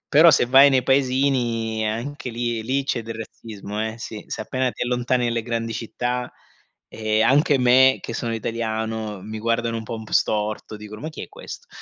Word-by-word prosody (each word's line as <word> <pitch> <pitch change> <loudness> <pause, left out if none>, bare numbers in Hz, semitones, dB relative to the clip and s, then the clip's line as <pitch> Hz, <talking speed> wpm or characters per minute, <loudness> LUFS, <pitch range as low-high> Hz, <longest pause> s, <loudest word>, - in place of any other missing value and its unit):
Però 160 +4 +8
se 125 - +4
vai 135 +3 +7
nei 130 -2 +3
paesini, 125 -5 +1
anche 125 +5 -4
lì 120 -1 -2
lì 130 +5 0
c'è 125 -3 -1
del 115 0 -6
razzismo, 105 -2 -7
eh, 110 +1 -6
sì. 110 -2 -7
Se - - -5
appena 130 +4 -1
ti - - -6
allontani 125 0 0
nelle 115 -1 0
grandi 115 -1 -3
città, 120 +2 -3 0.6
ehm, 110 0 +1
anche 145 +1 +4
me, 130 +1 +5
che - - -6
sono 115 -1 -2
italiano, 110 -2 -3
mi 110 +2 -6
guardano 115 +1 0
un 115 - -4
po' 115 - -5
un 110 - -8
p - - -14
storto, 105 0 0
dicono: 105 0 -10
"Ma 155 - -3
chi 155 - -8
è - - -8
questo?" 475 +2 -10
115 Hz, 195 wpm, -23 LUFS, 110-130 Hz, 0.6 s, Però